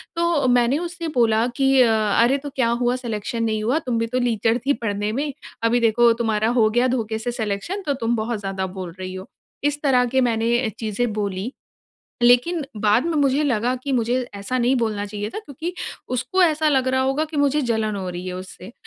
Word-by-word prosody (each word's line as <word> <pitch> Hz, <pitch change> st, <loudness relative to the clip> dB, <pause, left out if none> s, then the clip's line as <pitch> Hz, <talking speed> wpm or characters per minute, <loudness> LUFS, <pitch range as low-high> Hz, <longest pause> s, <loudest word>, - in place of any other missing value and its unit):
तो 335 Hz, -5 st, +1 dB
मैंने 245 Hz, +2 st, +3 dB
उससे 345 Hz, 0 st, -5 dB
बोला 225 Hz, -1 st, +3 dB
कि 270 Hz, -1 st, +3 dB
अ, 240 Hz, -, +6 dB, 0.4 s
"अरे 265 Hz, +4 st, +3 dB
तो 285 Hz, +1 st, -7 dB
क्या 245 Hz, -3 st, +2 dB
हुआ 245 Hz, +1 st, +2 dB
सिलेक्शन 230 Hz, -2 st, -3 dB
नहीं 215 Hz, -1 st, -1 dB
हुआ, 250 Hz, +8 st, +1 dB
तुम 250 Hz, -6 st, -2 dB
भी 230 Hz, -, 0 dB
तो 250 Hz, +2 st, -1 dB
लीचर 230 Hz, -1 st, +1 dB
थी 285 Hz, -, +3 dB
पढ़ने 210 Hz, -4 st, -2 dB
में। 280 Hz, +4 st, -2 dB, 0.3 s
अभी 230 Hz, +1 st, +3 dB
देखो 235 Hz, +1 st, +4 dB
तुम्हारा 220 Hz, -1 st, +1 dB
हो 215 Hz, -, +4 dB
गया 240 Hz, +3 st, +2 dB
धोखे 220 Hz, -1 st, -2 dB
से 240 Hz, +2 st, -3 dB
सिलेक्शन 230 Hz, -, -3 dB
तो 285 Hz, -, +1 dB
तुम 235 Hz, -2 st, -1 dB
बहुत 220 Hz, 0 st, -2 dB
ज़्यादा 195 Hz, -1 st, -3 dB
बोल 180 Hz, -2 st, -5 dB
रही 185 Hz, 0 st, -5 dB
हो", 185 Hz, +1 st, -8 dB, 0.3 s
इस 290 Hz, 0 st, 0 dB
तरह 255 Hz, -4 st, +3 dB
के 260 Hz, -, +5 dB
मैंने 230 Hz, +1 st, +1 dB
चीज़ें 220 Hz, +1 st, -1 dB
बोली। 200 Hz, +2 st, -3 dB, 0.7 s
लेकिन 250 Hz, +8 st, +4 dB, 0.2 s
बाद 215 Hz, +6 st, +3 dB
में 335 Hz, -, -1 dB
मुझे 280 Hz, +2 st, +2 dB
लगा 245 Hz, -2 st, +1 dB
कि 280 Hz, -, -3 dB
मुझे 240 Hz, 0 st, +1 dB, 0.2 s
ऐसा 200 Hz, +6 st, -3 dB
नहीं 250 Hz, +2 st, +2 dB
बोलना 215 Hz, -4 st, -1 dB
चाहिए 205 Hz, +1 st, -5 dB
था 425 Hz, -, -5 dB
क्योंकि 330 Hz, -, -6 dB, 0.4 s
उसको 315 Hz, +10 st, 0 dB
ऐसा 310 Hz, -2 st, +3 dB
लग 265 Hz, -3 st, +2 dB
रहा 260 Hz, 0 st, +2 dB
होगा 270 Hz, +4 st, +1 dB
कि 310 Hz, -1 st, -7 dB
मुझे 285 Hz, +1 st, +2 dB
जलन 220 Hz, -3 st, -1 dB
हो 190 Hz, -2 st, -4 dB
रही 175 Hz, +1 st, -6 dB
है 180 Hz, -, -4 dB
उससे 185 Hz, +2 st, -9 dB
240 Hz, 210 wpm, -22 LUFS, 215-270 Hz, 0.7 s, अ